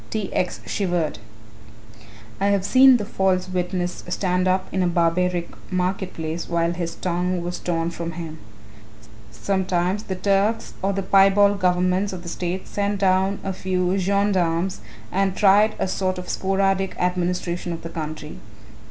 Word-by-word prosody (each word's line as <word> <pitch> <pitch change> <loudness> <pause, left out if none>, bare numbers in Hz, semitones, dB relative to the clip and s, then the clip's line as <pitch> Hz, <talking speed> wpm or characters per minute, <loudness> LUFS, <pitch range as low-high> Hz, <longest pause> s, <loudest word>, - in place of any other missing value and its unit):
T. 215 -3 -3
X. 180 - -1
shivered. 175 -5 -1 1.2
"I 200 - +2
have 200 -2 +2
seen 260 +1 +7
the 210 - -4
false 190 -3 0
witness 180 0 -2
stand 180 0 0
up 185 0 +1
in 190 - 0
a 180 - +2
barbaric 175 +1 +1 0.2
market 185 +1 -1
place 160 +1 -4
whilst 170 0 0
his 170 -2 -3
tongue 180 0 -1
was 175 +1 -4
torn 170 -1 -1
from 170 0 -5
him. 160 -1 -7 0.9
Sometimes 185 - -1
the 190 -3 -5
Turks 200 +4 +1
or 195 - +1
the 195 0 -2
piebald 195 +1 +5
governments 185 +2 +1
of 180 -2 -7
the 170 - -6
state 180 +2 -4
sent 205 0 -1
down 190 +1 +2
a 195 - -2
few 185 0 0
gendarmes 190 -2 +1 0.3
and 190 0 +1
tried 210 +2 +5
a - - -1
sort 185 0 -1
of 180 0 -7
sporadic 195 0 0
administration 180 -1 -1
of 165 -1 -6
the 165 - -5
country. 155 -2 -6
185 Hz, 150 wpm, -23 LUFS, 175-195 Hz, 1.2 s, seen